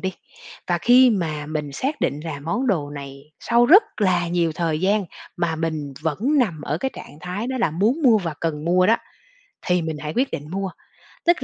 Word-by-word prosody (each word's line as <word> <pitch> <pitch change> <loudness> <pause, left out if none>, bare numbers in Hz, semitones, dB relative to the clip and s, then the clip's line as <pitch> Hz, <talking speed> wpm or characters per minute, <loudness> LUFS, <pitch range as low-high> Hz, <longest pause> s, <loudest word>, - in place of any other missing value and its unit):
đi. 190 0 -2 0.6
Và 175 -1 +1
khi 250 +6 +6
mà 155 -8 -2
mình 150 -2 -4
xác 270 - -3
định 140 +2 -1
là 150 -4 -5
món 205 - -2
đồ 155 - 0
này 140 0 -9
sau 235 0 +3
rất 385 - +8 0.2
là 180 -4 +2
nhiều 170 -2 +1
thời 160 -2 -1
gian 200 +2 +2 0.3
mà 165 -2 -1
mình 155 -3 -3
vẫn 160 -1 -1 0.2
nằm 190 - +1
ở 150 +2 -2
cái 265 - -2
trạng 150 - -11
thái 180 +8 -4
đó 260 0 -3
là 235 - +1
muốn 215 - +1
mua 235 -6 +6
và 165 -5 -4
cần 155 -2 -2
mua 180 +2 +3
đó 225 +2 +5 0.7
thì 180 -1 +2
mình 160 -1 -3
hãy 150 +1 -5
quyết 260 +2 +1
định 150 +2 -6
mua. 195 +1 -3 0.6
Tức 345 0 +3
170 Hz, 210 wpm, -22 LUFS, 155-215 Hz, 0.7 s, rất